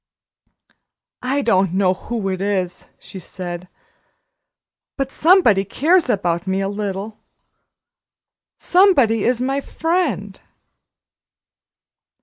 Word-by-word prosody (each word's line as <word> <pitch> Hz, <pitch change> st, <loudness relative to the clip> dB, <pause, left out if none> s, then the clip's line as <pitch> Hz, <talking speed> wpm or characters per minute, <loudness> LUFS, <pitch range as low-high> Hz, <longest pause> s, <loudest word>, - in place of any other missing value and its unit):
"I 275 Hz, +3 st, -1 dB
don't 190 Hz, -5 st, +2 dB
know 190 Hz, -1 st, +3 dB
who 215 Hz, +1 st, -5 dB
it 185 Hz, 0 st, -3 dB
is," 190 Hz, -3 st, -2 dB
she 190 Hz, -, -10 dB
said, 175 Hz, 0 st, -7 dB, 1.3 s
"but 270 Hz, -1 st, -2 dB
somebody 310 Hz, -, +4 dB
cares 315 Hz, -, +1 dB
about 175 Hz, -4 st, -1 dB
me 190 Hz, +1 st, 0 dB
a 195 Hz, 0 st, -1 dB
little 205 Hz, +1 st, -5 dB, 1.4 s
somebody 280 Hz, -, +3 dB
is 245 Hz, 0 st, +1 dB
my 270 Hz, +2 st, -1 dB
friend." 285 Hz, -, -2 dB
205 Hz, 95 wpm, -20 LUFS, 190-275 Hz, 1.4 s, somebody